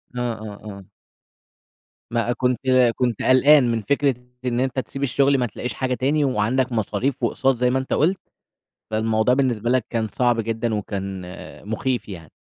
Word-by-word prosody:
آه، 125 - -2
آه، 110 -2 -9
آه. 100 0 -10 1.3
ما 120 +1 0
كنت 125 0 0 0.4
كنت 120 -4 -1
قلقان 130 0 +5
من 115 -1 -1
فكرة 140 +4 +1 0.3
إن 120 -1 0
أنتَ 130 0 0
تسيب 135 +1 -5
الشغل، 140 +1 +3
ما 125 - +1
تلاقِيش 115 +1 -5
حاجة 130 -1 -2
تاني، 140 +5 +1
وعندَك 125 +1 0
مصاريف 115 +4 -1
وأقساط 135 +3 +2
زي 125 0 +2
ما 130 - +1
أنتَ 130 - -3
قُلت. 180 +6 +2 0.7
فالموضوع 110 +2 +2
بالنسبة 120 -4 0
لك 130 -2 +2
كان 115 -2 -1
صعب 120 +1 +1
جدًا 115 0 -2
وكان 95 -2 -4 0.5
مخِيف 120 0 -2
يعني. 85 -5 -9
120 Hz, 160 wpm, -22 LUFS, 110-130 Hz, 1.3 s, قلقان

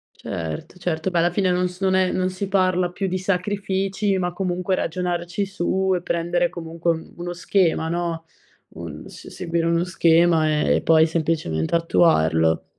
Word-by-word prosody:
Certo, 80 - -6
certo, 175 -1 -2
beh, 180 - -2
alla 170 +1 +3
fine 185 +1 +1
non 180 0 +1
s 180 +1 -12
non 190 -1 +2
è 185 -1 +2
non 185 0 0
si 185 +2 -4
parla 185 -2 +1
più 195 +2 -3
di 185 0 -1
sacrifici, 195 +1 -1
ma 180 -1 -2
comunque 180 0 -1
ragionarci 175 +2 -2
su 190 0 0
e 180 - -2
prendere 175 +1 0
comunque 170 0 -2
un 160 -1 -6
uno 175 0 -5
schema, 175 -2 +1
no, 170 -1 -3 0.5
un 80 -3 -8
s - - -12
seguire 165 0 -2
uno 170 0 +2
schema, 170 -2 +3 0.2
e - - +3
poi 160 0 +5
semplicemente 155 - -1
attuarlo. 80 - +2
175 Hz, 165 wpm, -22 LUFS, 165-185 Hz, 0.5 s, poi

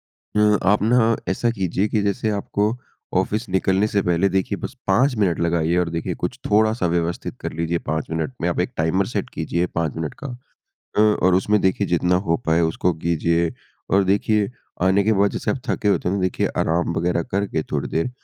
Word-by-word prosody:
अ, 105 -1 +1
आप 100 +2 +3
ना 115 0 +3
ऐसा 105 +6 +1
कीजिए 95 -2 -1
कि 105 0 0
जैसे 100 +2 0
आपको 105 +1 0 0.5
ऑफ़िस 110 +2 -1
निकलने 95 +2 +2
से 100 - +1
पहले 90 +2 +2
देखिए 95 -1 -1
बस - - -6
5 125 +8 +3
मिनट 90 -5 +1
लगाइए 85 0 +1
और 90 -1 +1
देखिए 85 0 -3
कुछ - - -4
थोड़ा-सा 110 -2 +3
व्यवस्थित 85 0 -2
कर - - -4
लीजिए, 85 +1 -1
5 80 -1 -3
मिनट 80 +8 -2
में 85 - 0
आप 85 - -1
एक 90 - -1
टाइमर 80 +4 +1
सेट - - -3
कीजिए, 85 +1 -1
5 85 -3 -2
मिनट 80 -2 -4
का - - -3 0.7
अ, - - +4
और 105 -4 +4
उसमें 105 +3 +2
देखिए 95 +1 +1
जितना 90 +1 +1
हो 85 - +3
पाए, 80 +1 +3
उसको 85 +2 +1
कीजिए। 85 +1 0 0.4
और 95 0 +4
देखिए 100 +2 +1 0.3
आने 95 +2 +4
के 110 - +3
बाद, 100 0 +3
जैसे - - -2
आप 135 - -2
थके 105 - 0
होते 100 - +1
हैं 95 - 0
ना 100 - 0
तो - - -2
देखिए 90 - 0
आराम 85 +1 +1
वगैरह 85 0 +1
करके 95 -5 0
थोड़ी 70 -2 -1
देर, 80 +10 -1
95 Hz, 205 wpm, -22 LUFS, 85-105 Hz, 0.7 s, अ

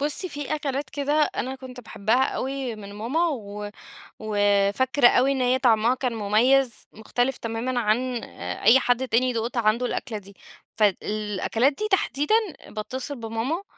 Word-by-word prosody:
بُصي 300 +6 -2
في 290 0 -4
أكلات 280 -2 -3
كده 285 0 -2 0.2
أنا 260 +2 -2
كنت 255 -1 -10
باحبها 220 +3 +1
أوي 265 -4 -3
من 200 -1 -10
ماما، 280 +11 0
و 210 -6 -5 0.5
وفاكرة 205 +5 +3
أوي 265 +3 +3
إن 265 -2 -1
هيّ 255 +1 +2
طعمها 235 0 +3
كان 255 -2 -2
مُميز، 230 +4 +2
مختلف 245 +4 -1
تمامًا 235 +2 -2
عن 240 +2 0
أ 90 +1 -7
أي 235 +6 +7
حد 245 +1 +1
تاني 250 +2 +2
دُقت 235 +2 -3
عنده 230 +2 +2
الأكلة 235 -3 -3
دي، 200 0 -13 0.4
فد 210 -4 +3
الأكلات 215 +5 0
دي 425 +8 -3
تحديدًا، 300 0 +2 0.3
باتّصل 260 +6 -5
بماما 230 - -3
245 Hz, 150 wpm, -25 LUFS, 215-265 Hz, 0.5 s, أي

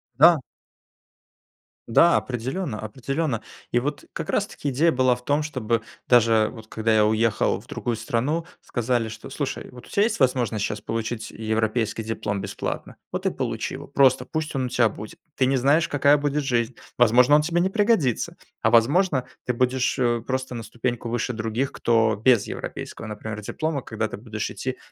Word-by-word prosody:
Да! 170 -3 +7 1.5
Да, 170 +9 +5
определенно, 130 - -3
определенно, 130 +3 -2 0.3
и 120 - +3
вот 145 +2 -3
как - - -5
раз - - +1
таки 145 - -5
идея 150 +6 +3
была 130 -3 +3
в 125 - -14
том, 145 +3 +1
чтобы 120 -7 -1 0.2
даже 115 -3 +5
вот, 110 -3 -11
когда 110 0 0
я 105 -1 +5
уехал 110 0 +1
в - - -20
другую 120 - -2
страну, 125 +9 -1
сказали, 120 -1 -1
что: 110 0 -9
"Слушай, - - -4
вот 125 -1 -12
у - - -17
тебя 205 0 +2
есть 230 - 0
возможность 120 -5 +1
сейчас 105 0 -4
получить 115 0 -4
европейский 110 +1 -1
диплом 105 -2 -3
бесплатно, - - -5 0.2
вот - - -3
и - - +2
получи - - -3
его, - - -9
просто 130 -2 +4
пусть 155 +1 -3
он 130 -1 0
у - - -3
тебя 120 -2 +3
будет." 105 +1 -9 0.2
Ты 130 - +2
не 135 +1 +2
знаешь, 140 +5 +3
какая 145 +1 +4
будет 145 0 -1
жизнь, 120 -2 0 0.2
возможно, 125 +4 +6
он 150 - +5
тебе 170 +3 +1
не 185 - +2
пригодится, 205 - +1 0.3
а - - +3
возможно, 135 +4 +3 0.2
ты 125 - 0
будешь, 125 +2 +1
э, 120 -3 +1
просто 130 -1 -2
на 115 - -5
ступеньку 120 +2 -3
выше 120 +1 -1
других, 115 +4 -2
кто 115 -2 +2
без 115 -1 +3
европейского, - - -6
например, 105 0 -6
диплома, 155 +6 -2
когда 110 -2 -3
ты - - -6
будешь 110 0 -4
идти 130 0 -4
120 Hz, 180 wpm, -24 LUFS, 110-140 Hz, 1.5 s, Да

